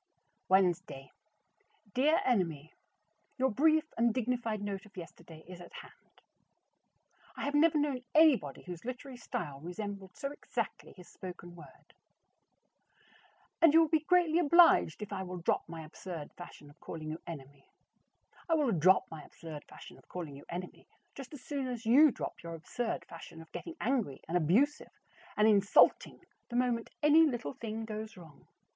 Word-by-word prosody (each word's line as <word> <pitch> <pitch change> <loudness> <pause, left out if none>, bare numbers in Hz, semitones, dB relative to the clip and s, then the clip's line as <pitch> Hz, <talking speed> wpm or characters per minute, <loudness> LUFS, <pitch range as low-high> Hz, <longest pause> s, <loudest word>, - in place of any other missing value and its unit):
Wednesday. 175 -8 +1 0.8
Dear 295 +6 +3
Enemy: 165 - 0 0.6
Your 265 0 +2
brief 310 +6 +4
and 235 0 +3
dignified 235 -2 -1
note 200 +1 -5
of 205 - -21
yesterday 165 -2 -11
is 180 -1 -10
at 175 - -12
hand. - - -14 1.2
I - - -4
have 285 - -2
never 310 +1 +4
known 285 -4 -1
anybody 290 - +4
whose 180 -2 -8
literary 255 +1 -7
style 140 - -5
resembled 190 +3 -7
so 275 - -4
exactly 290 - -5
his 180 - -13
spoken 175 -1 -10
word. 170 - -16 1.7
And 325 -2 +6
you 330 - +8
will 320 - +2
be 315 - +3
greatly 340 0 +3
obliged 335 - +5
if 205 - -7
I 190 - -3
will 185 -1 -6
drop 170 -1 -1
my 165 -1 -7
absurd 160 -1 -8
fashion 150 -4 -12
of - - -24
calling 155 -1 -7
you 160 - -6
"Enemy"? 140 -4 -10 0.8
I 330 - +4
will 295 -6 +2
drop 185 +1 +4
my 160 -1 -7
absurd 155 -1 -10
fashion - - -13
of - - -24
calling 165 -6 -7
you 140 - -12
Enemy 180 +1 -7 0.3
just 270 -3 -10
as 290 -4 -10
soon 280 -3 -3
as 240 -2 -5
you 280 +7 +7
drop - - -6
your 170 0 -7
absurd 175 +1 -4
fashion 165 -1 -11
of 165 0 -13
getting 335 - -7
angry 235 - -1
and 170 - -3
abusive 205 - +1 0.4
and 210 +1 +5
insulting 200 -2 +4 0.3
the 240 - -6
moment 245 -2 0
any 300 +2 +7
little 240 - -3
thing 225 0 -5
goes 215 -1 -6
wrong. 160 -5 -15
205 Hz, 160 wpm, -32 LUFS, 170-265 Hz, 1.7 s, you